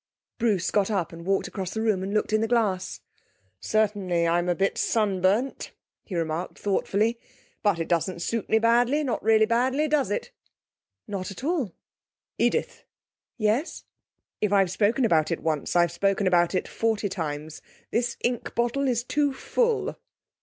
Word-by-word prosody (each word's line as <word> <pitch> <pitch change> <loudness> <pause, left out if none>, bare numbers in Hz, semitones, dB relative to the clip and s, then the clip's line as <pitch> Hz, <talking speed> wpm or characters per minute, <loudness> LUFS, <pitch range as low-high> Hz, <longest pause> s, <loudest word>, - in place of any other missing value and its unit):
Bruce 210 -6 +1
got 205 -1 +2
up 190 -6 -1
and 170 +1 -9
walked 195 0 +1
across 190 -1 -5
the - - -1
room 210 -4 +1
and 190 +1 -3
looked 215 +1 0
in 215 - +3
the 225 - +1
glass. 210 -6 0 0.6
'Certainly, 195 - +1
I'm 175 +1 +1
a 175 - +2
bit 195 +2 +1
sunburnt,' 210 +3 +1 0.3
he 190 - -7
remarked 165 +1 -2
thoughtfully. 210 +3 0 0.4
'But 205 -5 +2
it 165 - -3
doesn't 175 +1 0
suit 230 -3 -2
me 220 - +4
badly, 240 +6 +3
not 255 -5 -1
really 220 0 +4
badly; 255 +6 +1
does 295 -5 +1
it?' 205 - -3 0.8
'Not 195 -2 -4
at 195 - -9
all.' 290 - -1 0.6
'Edith.' - - 0 0.5
'Yes?' 225 +8 0 0.6
'If 210 -2 +1
I've 195 -3 +3
spoken 225 +6 +2
about 160 -7 +3
it 165 - -2
once, 155 -1 -1
I've 175 -1 +4
spoken 195 +3 +1
about 175 0 +3
it - - -1
forty 220 -2 0
times. 155 -5 -5 0.3
This 235 +1 0
ink 240 -1 -2
bottle 240 +4 +1
is 240 -2 +1
too 290 +3 +1
full.' 465 - 0
205 Hz, 160 wpm, -26 LUFS, 180-235 Hz, 0.8 s, me